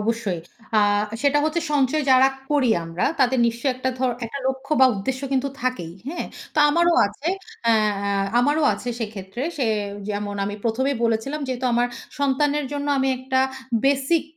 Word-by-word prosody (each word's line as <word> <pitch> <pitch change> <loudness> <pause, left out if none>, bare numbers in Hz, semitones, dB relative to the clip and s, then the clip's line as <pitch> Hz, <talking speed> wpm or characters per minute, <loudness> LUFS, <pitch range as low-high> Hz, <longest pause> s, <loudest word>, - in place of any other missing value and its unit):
অবশ্যই। 215 -4 -1 0.4
আ - - +6 0.4
সেটা 290 0 +3
হচ্ছে 315 +2 0
সঞ্চয় 290 +1 +2
যারা 260 +1 +7 0.2
করি 280 -5 +3
আমরা। 165 +2 -2 0.2
তাদের 260 0 +3
নিশ্চয়ই 235 +3 0
একটা 255 +1 -2
ধর 255 0 +1
একটা 230 +5 -5
লক্ষ্য 265 +2 -2
বা 260 - +9
উদ্দেশ্য 255 +7 -3
কিন্তু 270 +1 +1
থাকেই। 250 -10 -2 0.2
হ্যাঁ? 340 - -4 0.3
তো - - -1
আমারও 340 +2 +3
আছে 210 +11 -5 0.4
এ্যা 230 - +5 0.3
আ 200 +3 +1
আমারও 290 +5 +2
আছে 245 - -6
সেক্ষেত্রে 210 +1 -5
সে 265 -5 0 0.4
যেমন 205 0 -3
আমি 205 - -3
১ম 230 +3 0
এই - - -3
বলেছিলাম। 230 +6 -1
যেহেতু 255 0 -2
আমার 240 +1 +3 0.3
সন্তানের 285 +1 +1
জন্য 285 0 -3
আমি 265 0 +2
একটা 260 0 0 0.4
বেসিক 275 +4 +2
260 Hz, 165 wpm, -23 LUFS, 230-280 Hz, 0.4 s, বা